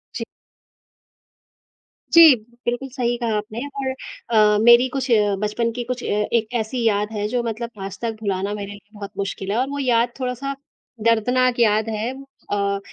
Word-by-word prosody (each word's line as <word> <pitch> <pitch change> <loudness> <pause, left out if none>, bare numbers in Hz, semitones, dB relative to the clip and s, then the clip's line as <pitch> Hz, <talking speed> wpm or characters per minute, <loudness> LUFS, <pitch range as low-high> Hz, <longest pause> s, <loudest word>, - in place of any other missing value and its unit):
जी। - - -3 1.9
जी, 325 -5 +9 0.3
बिल्कुल 245 +3 -2
सही 240 -2 0
कहा 230 -3 -1
आपने 215 +2 -5
और 275 -1 -4 0.4
अ, 210 -2 +4
मेरी 240 +2 +7
कुछ 265 -1 -3
अ, 205 -3 +3
बचपन 220 +2 -1
की 240 +1 -4
कुछ 245 0 -4
अ, - - -4
एक 215 +2 0
ऐसी 230 +2 -3
याद 210 0 +1
है 210 -1 -2
जो 245 +2 -1
मतलब 230 +1 -4
आज 195 0 -7
तक 230 - -1
भुलाना 200 0 -1
मेरे 205 -1 -5
लिए 205 0 -13
बहुत 205 -1 -8
मुश्किल 195 0 -3
है 220 - 0
और 260 +2 0
वो 285 0 -4
याद 240 -2 +2
थोड़ा-सा 255 +2 -3 0.5
दर्दनाक 245 +2 +2
याद 220 -1 +3
है। 220 +2 -2 0.4
अ, 200 -1 0
230 Hz, 170 wpm, -22 LUFS, 210-250 Hz, 1.9 s, जी